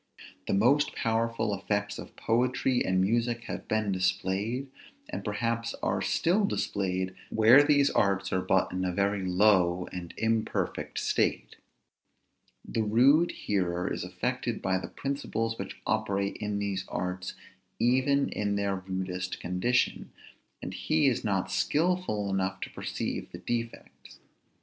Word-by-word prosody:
The - - +1
most 130 +9 +3
powerful 115 -1 0
effects 105 +1 -2
of - - -10
poetry 125 +2 +1
and 95 0 +1
music 115 +4 +1
have - - -6
been 110 -2 0
displayed, 95 +7 -1 0.4
and - - -5
perhaps 115 +2 -2
are - - 0
still 185 +6 +2
displayed, 95 - -1 0.2
where 115 +5 +7
these 145 -1 +4
arts 100 -2 +1
are 95 - +2
but 95 0 +2
in 95 0 -2
a 90 - 0
very 100 +2 0
low 90 -2 +3
and 90 -2 -6
imperfect 110 0 -1
state. - - 0 1.1
The 115 - -1
rude 130 +10 +4
hearer 90 -3 -1
is - - -3
affected - - -2
by 95 0 0
the - - -6
principles 115 -5 -3
which 95 - -6
operate 100 -2 0
in 105 -1 -2
these 100 -2 -2
arts 90 0 -4 0.4
even 130 +3 +2
in 100 -1 -1
their 100 -1 0
rudest 95 -1 -4
condition; 90 +8 0 0.5
and - - -5
he 155 -1 +1
is 130 -4 +2
not 95 -2 0
skilful 150 - 0
enough 95 0 -1
to - - -5
perceive - - -4
the - - -7
defects. 115 -1 -5
105 Hz, 135 wpm, -29 LUFS, 95-120 Hz, 1.1 s, where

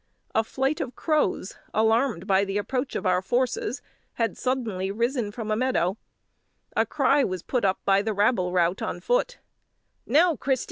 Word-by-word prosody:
A 220 - +3
flight 270 +6 -1
of 255 - -5
crows, 300 - 0 0.2
alarmed 220 -3 +2
by 195 -1 +3
the 195 0 -2
approach 255 +6 -2
of - - -3
our 180 0 +3
forces, 255 - -1 0.3
had 230 -1 -1
suddenly 225 -8 -2
risen 235 +1 -1
from 220 0 -5
a - - +2
meadow; 215 -7 +1 0.8
a - - +2
cry 280 0 +3
was 185 -5 -3
put 250 - -1
up 190 -1 +2
by 195 0 +4
the 220 +2 -1
rabble 200 -3 +2
rout 175 +1 +1
on - - -3
foot - - 0 0.7
"Now, 325 +6 +4
Christy! 260 0 0
225 Hz, 170 wpm, -26 LUFS, 195-265 Hz, 0.8 s, by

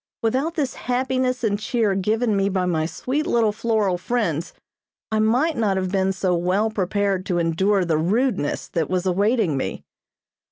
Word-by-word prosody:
Without 265 +9 0
this 285 -6 -1
happiness 255 0 -1
and 205 -2 +1
cheer 220 -2 0
given 215 +4 +1
me 195 0 +1
by 185 -2 0
my 160 -3 0
sweet 270 - -2
little 230 -3 +2
floral 210 -4 0
friends 180 -7 -1 0.6
I 220 - +1
might 250 +9 +2
not 205 -4 +1
have 185 -1 -2
been 190 -1 +1
so 185 -1 0
well 185 +6 +1
prepared 195 -1 0
to 180 - 0
endure 180 +4 +1
the 160 -2 +1
rudeness 200 - 0
that 165 -3 -1
was 185 0 -1
awaiting 195 - +1
me. 130 - -4
200 Hz, 165 wpm, -22 LUFS, 180-235 Hz, 0.6 s, little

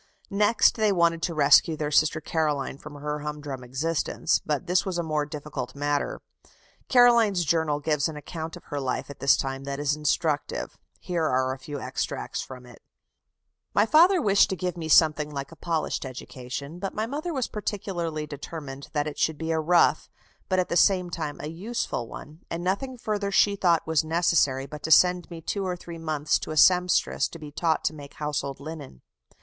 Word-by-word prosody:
Next 210 +4 +3
they 215 -2 +3
wanted 170 -3 +2
to 170 -1 -2
rescue 155 +2 +5
their 150 -1 -2
sister 155 +1 +3
Caroline 150 -4 -1
from 150 -1 -10
her 150 +1 -4
humdrum 145 -3 -6
existence, 145 +6 -1
but 150 +3 -2
this 180 +1 +2
was 185 -3 -3
a 170 - 0
more 155 -2 -1
difficult 145 -4 -6
matter. 145 0 -1 0.7
Caroline's 235 -8 +5
journal 155 -1 +1
gives 150 -1 +1
an 155 - -7
account 160 +1 -6
of - - -15
her 145 - -5
life 135 +1 -3
at 140 - -12
this 140 - +4
time 135 0 -3
that 140 0 -4
is 145 0 +1
instructive. 150 0 -1 0.2
Here 170 -3 -2
are 130 -2 +1
a 135 - -9
few 145 +2 -6
extracts - - -3
from 125 -1 -10
it: 125 -1 -15 0.9
"My 205 - +5
father 345 - +6
wished 200 -7 +4
to 190 - -1
give 180 0 -3
me 160 -2 -5
something 155 -2 +4
like 140 0 -6
a - - -11
polished 160 -1 -2
education, 130 +4 -7
but 195 +1 -4
my 215 - -1
mother 295 +8 -4
was 265 -6 -1
particularly 175 -7 -3
determined 145 -1 -8
that 145 -1 0
it 150 - -6
should 160 -1 +1
be 160 +1 -3
a 160 - +1
rough, 170 +2 +3 0.4
but 185 - +2
at 185 - +1
the - - -1
same 180 0 +3
time 155 -3 -4
a - - -5
useful 170 - -3
one; 150 +6 -10
and 165 +1 -4
nothing 250 +8 -2
further 210 -3 -2
she 200 +1 +3
thought 175 -4 +2
was 160 -1 +2
necessary 155 -5 +2
but 150 +1 -9
to - - -4
send 180 +2 +5
me 170 -2 -8
two 195 +5 -3
or 185 -1 -2
three 170 -1 -9
months 155 -2 0
to - - -7
a 155 - -4
sempstress 180 +2 +4
to - - -10
be 150 -2 -9
taught 160 +2 0
to - - 0
make 145 -2 -11
household 145 -2 -3
linen.... 145 - -9
160 Hz, 195 wpm, -26 LUFS, 145-180 Hz, 0.9 s, father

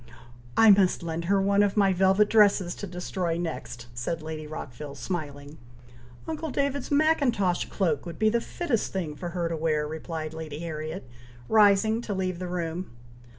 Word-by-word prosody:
"I 225 -1 +8
must 190 -3 +3
lend 165 0 -3
her 195 +2 +3
one 200 +1 +3
of 205 0 +1
my 195 -2 +4
velvet 190 +3 +4
dresses 205 -5 +4
to 205 - -7
destroy 180 -1 -3
next," 160 -8 -5
said 140 +7 -3
Lady 155 -1 -6
Rockville, 145 -1 -7
smiling. 145 0 -5 0.7
"Uncle 320 0 -3
David's 280 0 -1
Mackintosh 275 - +2
cloak 185 -2 -1
would 170 - -7
be 215 0 +3
the 235 +2 +1
fittest 280 - -2
thing 170 -6 -3
for 175 +2 -5
her 170 -1 -2
to 165 - -2
wear," 155 -1 0
replied 160 0 -5
Lady 160 -2 -6
Harriet, 155 -1 -5 0.4
rising 220 +1 +4
to 210 -4 -4
leave 185 -2 -2
the 180 - -4
room. 175 0 -3
180 Hz, 165 wpm, -27 LUFS, 160-205 Hz, 0.7 s, I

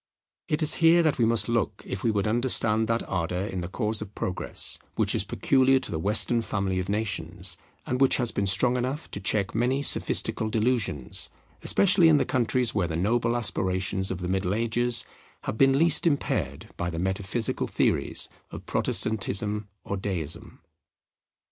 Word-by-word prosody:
It 150 +1 0
is 155 - +7
here 165 +1 +6
that 155 -5 +1
we 115 - +4
must 115 0 +1
look 115 -4 -1
if 95 - -5
we 115 - +2
would 105 -2 0
understand 110 -1 +2
that 115 +1 -1
ardour 90 +1 -2
in 95 -3 -4
the 85 - -5
cause 105 +3 -2
of 105 -1 -8
Progress 90 - -4 0.2
which - - +2
is - - 0
peculiar 135 0 +2
to 130 - -4
the 80 - -3
Western 105 +5 +4
family 95 -4 -2
of 90 +1 -4
nations, 95 -4 -3 0.3
and 125 +1 -2
which 135 - +5
has 120 -3 0
been 100 - -1
strong 120 +6 +2
enough 130 +5 -4
to - - -5
check 100 -3 -1
many 125 +5 0
sophistical 110 -5 +1
delusions, 110 - -1 0.3
especially 180 -3 +4
in 155 - +5
the - - +1
countries 125 -1 0
where 90 -4 0
the 80 - -4
noble 115 +6 +1
aspirations 95 -3 0
of 95 -1 -4
the 90 - -3
Middle 95 +1 -1
Ages 120 +1 0 0.4
have 110 - -5
been 135 0 +5
least 165 +2 +5
impaired 145 -3 -2
by 85 - -2
the 85 - -6
metaphysical 95 +5 -2
theories - - 0 0.2
of - - -10
Protestantism 105 -1 0
or 100 - -4
Deism. 90 -6 -5
110 Hz, 175 wpm, -26 LUFS, 95-125 Hz, 0.4 s, is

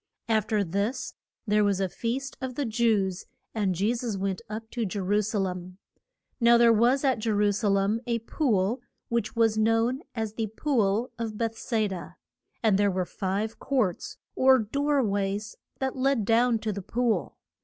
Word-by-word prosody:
Af 220 -2 +1
ter 210 -2 +1
this 205 +9 -2 0.3
there 210 -1 +3
was 200 -2 +1
a 190 - +1
feast 245 +8 -3
of 260 -1 -4
the 285 - -1
Jews, 215 -5 +1 0.3
and 200 -4 0
Je 205 +7 +1
sus 235 -4 -3
went 195 -1 -2
up 220 +1 -6
to 240 - -2
Je 205 0 -3
ru 205 +3 +2
sa 215 +1 -2
lem. 185 -1 -3 0.6
Now 235 -1 +6
there 235 -1 +6
was 245 +5 +3
at 260 -4 +2
Je 225 - -2
ru 205 -1 +3
sa 210 +2 -1
lem 200 +3 +2
a 235 -1 +1
pool, 230 -2 0 0.3
which 235 0 -1
was 225 -2 +3
known 225 +4 +2
as 220 -2 -3
the 225 0 -2
Pool 230 -5 +1
of 220 -2 -4
Be 230 0 0
thes 225 - -12 0.2
da. 185 -3 -7 0.5
And 210 -3 +3
there 205 0 +4
were 185 -1 -1
five 200 +5 -3
courts, 250 -10 -1 0.2
or 260 0 +6
door 280 +5 +1
ways, 200 0 -2 0.2
that 265 -1 -2
led 260 -4 +1
down 230 +2 +3
to 215 -1 -2
the 200 - -5
pool. 235 +4 -1
220 Hz, 185 wpm, -27 LUFS, 200-235 Hz, 0.6 s, Now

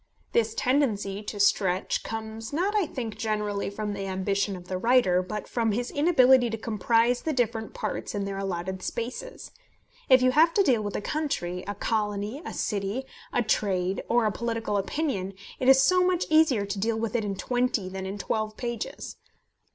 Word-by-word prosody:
This 225 -1 +1
tendency 215 -7 0
to 210 0 -6
stretch 190 -2 +2
comes 220 0 -6
not, 365 +8 0
I 405 -6 +2
think, 235 -7 -5
generally 210 -2 -1
from 210 +1 -4
the 195 -1 -4
ambition 195 +1 -1
of 180 -1 -11
the 185 0 -3
writer, 230 -6 +4
but 210 +3 -5
from 225 -3 0
his 240 +3 -2
inability 265 -5 +5
to 225 - -3
comprise 230 +3 +1
the 315 - -1
different 230 -3 -1
parts - - -4
in 200 -1 -1
their 195 0 -4
allotted 190 -1 -3
spaces. 250 - -5 0.6
If 260 -1 +7
you 255 - +5
have 320 +5 +4
to 400 - +5
deal 250 - +3
with 205 -1 -4
a - - -1
country, 205 - -2
a 205 - -3
colony, 210 +4 -2
a - - -6
city, 205 +4 -2 0.3
a 245 - +1
trade, 190 -3 0
or 235 -1 +3
a 215 - +2
political 230 -2 -2
opinion, 195 - -2 0.2
it 255 - +3
is 265 0 +8
so 365 +7 +4
much 360 -1 +1
easier 310 -10 +4
to 200 0 -4
deal 220 +2 0
with 225 +1 -2
it 230 - +1
in 200 -1 -2
twenty 245 -2 0
than 190 0 -5
in 195 +2 -5
twelve 215 +2 -2
pages! 235 -2 -5
220 Hz, 185 wpm, -27 LUFS, 200-250 Hz, 0.6 s, is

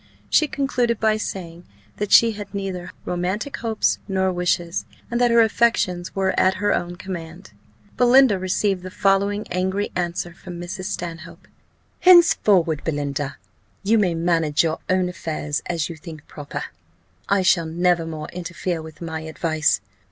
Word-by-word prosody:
She 310 - +4
concluded 250 -5 0
by 215 -1 +2
saying, 175 -5 -6 0.3
that 205 -1 -3
she 230 -1 +7
had 205 -2 -8
neither 185 -2 -4
romantic 190 +10 -2
hopes 225 -2 0
nor 190 -1 +1
wishes, 175 0 0 0.3
and 240 +1 0
that 245 - +4
her 235 0 +5
affections 210 -6 +1
were 190 -1 +1
at 190 0 +3
her 205 +1 +1
own 175 0 -2
command. 175 - -8 0.5
Belinda 245 -4 +5
received 185 +1 0
the 185 - -7
following 200 +2 +1
angry 190 +3 -1
answer 175 0 -2
from 175 0 -9
Mrs. 175 +2 -6
Stanhope: 170 -4 -6 0.5
"Henceforward, 205 - +5
Belinda, 145 -2 -3 0.5
you 220 +3 +3
may 180 -5 +1
manage 165 -3 +2
your 160 -1 -1
own 185 0 +2
affairs 155 -4 -3
as 165 -4 -1
you 170 - -7
think 160 -1 -11
proper; 145 -2 -6 0.7
I 200 -1 +3
shall 170 -3 +3
never 170 0 +1
more 155 -2 -6
interfere 175 -1 -4
with 155 0 -12
my 160 -1 -4
advice. 160 - 0
180 Hz, 150 wpm, -22 LUFS, 165-205 Hz, 0.7 s, she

